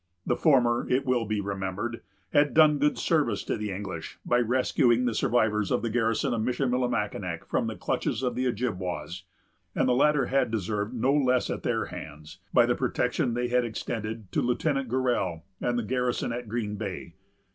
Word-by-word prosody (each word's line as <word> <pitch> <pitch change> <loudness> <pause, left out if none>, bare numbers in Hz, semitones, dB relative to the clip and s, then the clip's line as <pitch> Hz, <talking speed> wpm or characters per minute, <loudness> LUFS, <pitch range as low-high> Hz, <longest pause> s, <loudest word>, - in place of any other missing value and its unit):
The 120 - +1
former, 120 -6 +3
it 130 +2 +1
will 125 -3 +1
be 105 0 -1
remembered, 100 +4 -3 0.3
had 145 0 +3
done 155 -2 +6
good 150 +1 +2
service 155 -3 +1
to - - -2
the 105 -1 -4
English, 95 -4 -6
by 120 - +3
rescuing 125 0 +2
the 120 - +1
survivors 110 -5 +1
of - - 0
the 115 - -1
garrison 115 +3 +1
of 115 - -1
Michillimackinac 120 - -1
from - - -1
the - - -4
clutches - - -2
of 125 - 0
the 130 0 0
Ojibwas; 95 -6 -3 0.5
and - - +2
the 125 - +4
latter 145 +1 +3
had 135 -1 +1
deserved 105 +1 -2
no 130 +4 +2
less 130 -4 +2
at - - -3
their - - 0
hands, 75 +1 -9
by - - +5
the - - +2
protection 120 -2 0
they 120 0 -1
had 125 0 +3
extended 110 -2 -5
to - - +1
Lieutenant 135 +1 0
Gorell, 120 -10 0 0.2
and 120 0 0
the 120 - 0
garrison 125 +2 -1
at 120 -2 -6
Green 105 -2 -2
Bay. 95 -5 -6
120 Hz, 180 wpm, -27 LUFS, 105-125 Hz, 0.5 s, done